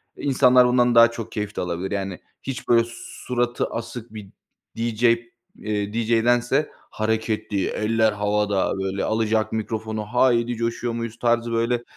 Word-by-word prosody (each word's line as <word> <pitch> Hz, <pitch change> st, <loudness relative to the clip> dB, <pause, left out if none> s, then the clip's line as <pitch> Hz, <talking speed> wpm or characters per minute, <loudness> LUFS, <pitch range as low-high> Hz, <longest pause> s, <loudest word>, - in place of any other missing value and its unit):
insanlar 125 Hz, -2 st, +4 dB
bundan 125 Hz, -1 st, +3 dB
daha 115 Hz, 0 st, +7 dB
çok 115 Hz, -1 st, -7 dB
keyif 105 Hz, -1 st, -4 dB
de -, -, -2 dB
alabilir, 90 Hz, +1 st, -3 dB
yani, 95 Hz, -2 st, -3 dB, 0.2 s
hiç, 135 Hz, 0 st, -6 dB
böyle, 115 Hz, -1 st, +4 dB
suratı 120 Hz, 0 st, -2 dB
asık 115 Hz, 0 st, -7 dB
bir 105 Hz, -3 st, -9 dB, 0.5 s
DJ, 115 Hz, 0 st, -2 dB, 0.5 s
eee, 105 Hz, -1 st, -3 dB
DJ'dense 120 Hz, +5 st, +2 dB, 0.2 s
hareketli 110 Hz, -2 st, -1 dB
eller 110 Hz, 0 st, +1 dB
havada, 105 Hz, -1 st, 0 dB
böyle, 95 Hz, +1 st, -2 dB
alacak 110 Hz, 0 st, 0 dB
mikrofonu 110 Hz, 0 st, -3 dB
"Haydi 120 Hz, +1 st, +2 dB
coşuyor 115 Hz, +1 st, -2 dB
muyuz?" 115 Hz, -1 st, -5 dB
tarzı, 120 Hz, -1 st, +1 dB
böyle, 115 Hz, +1 st, 0 dB
115 Hz, 135 wpm, -23 LUFS, 105-120 Hz, 0.5 s, daha